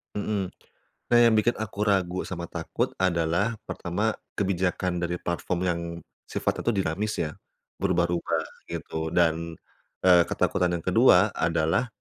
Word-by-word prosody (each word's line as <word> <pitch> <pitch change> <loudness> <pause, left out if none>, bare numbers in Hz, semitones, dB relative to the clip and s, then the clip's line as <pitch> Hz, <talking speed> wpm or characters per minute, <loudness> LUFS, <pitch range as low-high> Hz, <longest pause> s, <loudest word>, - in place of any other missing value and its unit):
Mhm. 100 -2 -1 0.6
Nah 120 - +7
yang 115 -2 +6
bikin 115 +3 +3
aku 105 -2 -5
ragu 95 -2 +1
sama 85 -2 -5
takut 85 -1 -2
adalah 85 +4 +1
pertama 100 +6 -1 0.2
kebijakan 90 -2 0
dari 85 0 -1
platform 85 +1 -2
yang 85 -2 0 0.5
sifatnya - - -1
tuh 115 - +3
dinamis 95 +4 -1
ya, 75 - -1 0.5
berubah-rubah 85 -3 +1 0.3
gitu. 80 0 -4
Dan, 85 -1 +1 0.5
eee, 90 -2 +7
ketakutan 90 -1 +1
yang 85 - -5
kedua - - +5
adalah, 80 +8 +1
90 Hz, 130 wpm, -26 LUFS, 85-100 Hz, 0.6 s, Nah